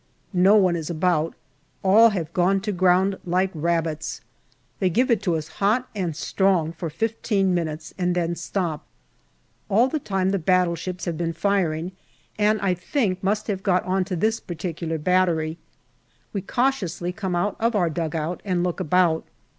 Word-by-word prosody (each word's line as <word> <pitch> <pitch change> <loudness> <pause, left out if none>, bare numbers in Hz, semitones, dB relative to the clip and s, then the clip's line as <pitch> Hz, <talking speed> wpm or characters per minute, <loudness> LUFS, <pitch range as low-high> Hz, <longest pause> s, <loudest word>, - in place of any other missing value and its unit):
No 190 +3 +5
one 185 -4 +4
is 160 -3 -4
about; 165 -1 0 0.5
all 215 +4 +7
have 170 -6 -4
gone 190 +1 +3
to 210 +1 -2
ground 185 +1 +2
like 185 +2 +1
rabbits. 160 -1 -2 0.6
They 185 - +2
give 250 +8 +2
it 210 -3 +1
us 160 -3 0
hot 225 +6 +2
and 180 -7 -2
strong 180 -1 +1
for 170 0 -5
fifteen 205 0 0
minutes, 160 -2 -3
and 180 -1 +1
then 170 -1 0
stop. 170 -2 -3 0.9
All 225 +6 +4
the 310 - -1
time 190 -6 0
the 195 - 0
battleships 180 0 0
have 170 -3 -3
been 165 -1 -1
firing, 175 -2 0 0.5
and 210 +1 +3
I 190 -2 +2
think 185 - -1
must 210 +2 0
have 195 -3 -2
got 185 -2 +1
on 185 +1 +1
to 185 -1 -3
this 220 +6 +1
particular 165 -2 -4
battery. 165 -1 +1 0.7
We 200 - -2
cautiously 195 -7 -1
come 190 -2 -3
out 195 +4 0
of 230 0 +1
our 175 -5 +2
dugout 160 +1 -3
and 180 -3 0
look 180 0 -2
about. 175 -1 +2
180 Hz, 160 wpm, -24 LUFS, 170-195 Hz, 0.9 s, all